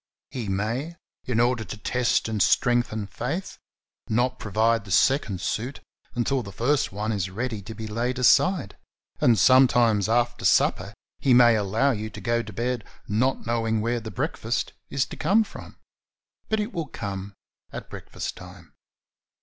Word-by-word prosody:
He 120 -6 -4
may, 115 - -2 0.3
in 120 -3 0
order 120 -1 +2
to 105 - -8
test 125 +3 0
and 110 -2 -2
strengthen 120 -1 +2
faith, 140 - -5 0.5
not 125 +3 +1
provide 110 +2 +1
the 100 - -13
second 105 -3 +2
suit 125 +6 -3 0.4
until 125 +2 0
the 100 -4 -8
first 135 +7 0
one 105 +3 -2
is 95 -3 -2
ready 110 +2 -4
to 110 +3 -9
be 110 - -6
laid 120 +4 -2
aside, 165 +6 +3 0.4
and 120 -2 +4
some 130 +2 +7
times 110 -5 +2
after 120 +1 +1
supper - - +2 0.2
he 130 -3 +4
may 120 -2 +7
allow 110 +7 +1
you 110 -2 -3
to - - -10
go 115 0 0
to 110 - -9
bed 120 +2 -2 0.2
not 125 +6 0
knowing 115 -1 0
where 120 +2 0
the 110 -1 -7
breakfast 100 - -2 0.2
is 135 -2 0
to - - -9
come 200 +8 +3
from, 210 - -12 0.7
but 220 - +1
it 210 +2 -3
will 165 -4 -3
come 100 -4 -6 0.4
at - - -7
break - - -10
fast - - -5
time. - - -13
120 Hz, 165 wpm, -25 LUFS, 110-130 Hz, 0.7 s, some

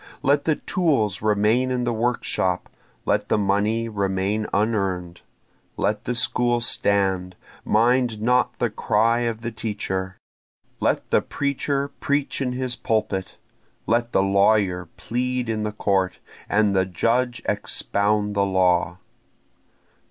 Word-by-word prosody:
Let 145 +1 +2
the 155 - +2
tools 135 - 0
remain 110 +4 +2
in 125 -1 -1
the 120 -1 0
workshop! 110 -6 -1 0.4
let - - 0
the - - +3
money 105 +3 +1
remain 100 0 -1
unearn'd! 95 -5 -1 0.6
Let 105 0 -1
the 125 - -1
school 120 0 +2
stand! 95 -5 +1 0.3
mind 120 0 +2
not 125 +3 +1
the 120 -3 0
cry 115 +3 +2
of 115 -2 -2
the 120 0 -4
teacher! 95 -4 -4 0.6
Let - - 0
the - - +4
preacher 140 0 -2
preach 140 0 -1
in 125 -2 -1
his 125 -1 -2
pulpit! 105 -5 -2 0.5
let 115 +1 +1
the 95 - +3
lawyer 100 -3 +2
plead 125 +1 -2
in 110 -1 -1
the 105 0 -2
court, 95 -3 0 0.3
and 105 -1 +2
the 95 -1 +2
judge 120 +6 0
expound 105 0 0
the 100 - +1
law. 90 -2 +2
110 Hz, 130 wpm, -23 LUFS, 100-120 Hz, 0.6 s, the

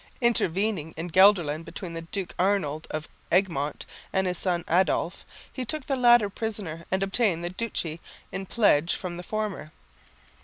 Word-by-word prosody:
Intervening 200 - +1
in 170 +2 -4
Gelderland 175 -5 +5
between 170 +1 -7
the 165 - -4
Duke 180 +2 -5
Arnold 180 -6 +1
of 155 +1 -4 0.2
Egmont 165 -6 +1 0.3
and 190 0 +1
his 180 -2 -1
son 175 -2 0
Adolf, 180 0 +1 0.3
he 260 - -3
took 270 +3 -3
the 275 - 0
latter 240 -4 +6
prisoner 200 -6 -4
and 190 +1 +1
obtained 195 -4 +1
the 175 - -2
duchy 180 -6 -3 0.3
in 190 +1 -5
pledge 175 -8 +3
from 175 -2 -5
the - - -5
former. 210 -4 -4
185 Hz, 155 wpm, -27 LUFS, 165-210 Hz, 0.3 s, latter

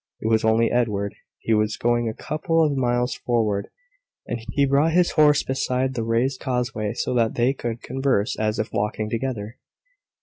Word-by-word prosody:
It - - -3
was 110 0 +2
only 110 +1 +3
Edward. 105 -4 0 0.2
He 115 - -1
was 110 0 +1
going 120 -1 +1
a 110 - -6
couple 165 +1 0
of 150 -2 +1
miles 125 -1 +1
forward, 110 -4 -1 0.6
and 120 - -4
he 140 - +3
brought 140 +4 +2
his 175 0 +3
horse 150 -2 +4
beside 130 0 -1
the 120 - -2
raised 120 +4 0
causeway, 125 -5 -2
so - - -2
that 115 -2 +1
they 125 +3 +2
could 120 -3 -5
converse 130 -4 0
as 110 0 0
if 110 - -3
walking 105 +1 -2
together. 115 -3 -4
120 Hz, 175 wpm, -23 LUFS, 110-135 Hz, 0.6 s, horse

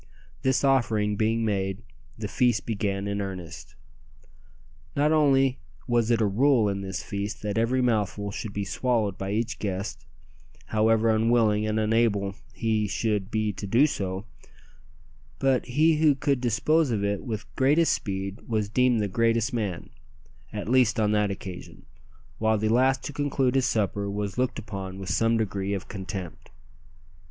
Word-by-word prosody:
This 130 0 +1
offering 110 -6 +2
being 115 +2 +1
made, 95 0 -1 0.3
the 110 -1 -4
feast 120 0 +1
began 100 -2 -2
in 100 0 -2
earnest. 95 -4 -7 1.2
Not 150 +2 +2
only 135 -4 +3 0.3
was 120 -2 +2
it 115 -2 +3
a - - +4
rule 115 +2 +3
in 100 -1 -2
this 95 -1 -5
feast 100 0 -5
that 105 -1 -2
every 125 +3 +1
mouthful 105 -3 0
should 105 +1 -5
be 100 0 -3
swallowed 110 -2 0
by 95 - -5
each 115 +2 -2
guest, 95 -8 -4 0.7
however 110 +1 +3
unwilling 110 -1 +2
and 110 0 0
unable 110 -3 +1 0.2
he 110 -2 0
should 105 -1 -1
be 110 -1 -1
to 100 - -6
do 120 +9 +5
so, 95 -8 -3 1.1
but 135 -2 +1
he 155 +5 +3
who 150 -2 +4
could 140 -2 0
dispose 135 +6 +2
of 105 -4 -1
it 100 0 -1
with 110 -4 -4
greatest 150 +5 +3
speed 95 0 -4
was 110 -3 -1
deemed 125 0 +2
the 105 - 0
greatest 115 +4 +1
man 100 -7 -3 0.6
at 105 -1 -5
least 120 -2 +3
on 105 -1 +2
that 105 -1 +2
occasion 95 -2 -8 0.5
while 110 0 +2
the 110 +1 0
last 130 +3 +3
to 145 - -5
conclude 135 -3 0
his 135 -1 +2
supper 100 -3 -1
was 100 -1 -3
looked 125 -1 0
upon 95 -4 -6
with 95 -1 -6
some 115 +4 +2
degree 100 -2 -1
of 95 - -6
contempt! 95 -4 -7
110 Hz, 160 wpm, -26 LUFS, 100-125 Hz, 1.2 s, do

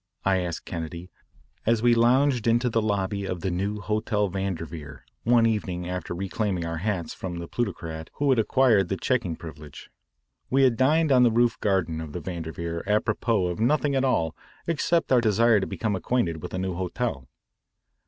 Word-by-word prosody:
I 95 -1 +3
asked 85 -2 -4
Kennedy 85 +2 -6 0.5
as 115 0 +1
we 120 -1 +5
lounged 125 +1 +3
into 120 +1 +2
the 115 - +2
lobby 100 -1 -1
of 90 -3 -4
the 95 - -1
new 100 +4 -2
Hotel 105 -1 0
Vanderveer 85 -5 -5 0.2
one 120 0 +5
evening 95 -6 -1
after 90 -1 -4
reclaiming 95 0 -2
our 85 0 -3
hats 90 -1 -2
from 90 -2 -6
the 85 0 -6
plutocrat 80 -9 -4
who 145 -1 +2
had 125 - +3
acquired 110 -5 +3
the 95 - -1
checking 115 -10 0
privilege. 75 -3 -11 0.6
We 135 0 +3
had 125 -3 +4
dined 150 +5 +3
on 130 -2 +6
the 125 - +6
roof 115 0 +2
garden 90 -6 0
of 75 -2 -8
the 90 - -3
Vanderveer 85 -1 -5
apropos 105 -1 +1
of 90 +1 -3
nothing 145 +5 +2
at 135 -1 +1
all 85 -12 +1 0.3
except 165 -1 0
our 125 -2 +5
desire 115 0 +4
to 95 - -2
become 110 -3 -2
acquainted 90 -6 -1
with - - -6
a - - -2
new 95 0 -2
hotel. 90 - -3
100 Hz, 180 wpm, -26 LUFS, 85-120 Hz, 0.6 s, on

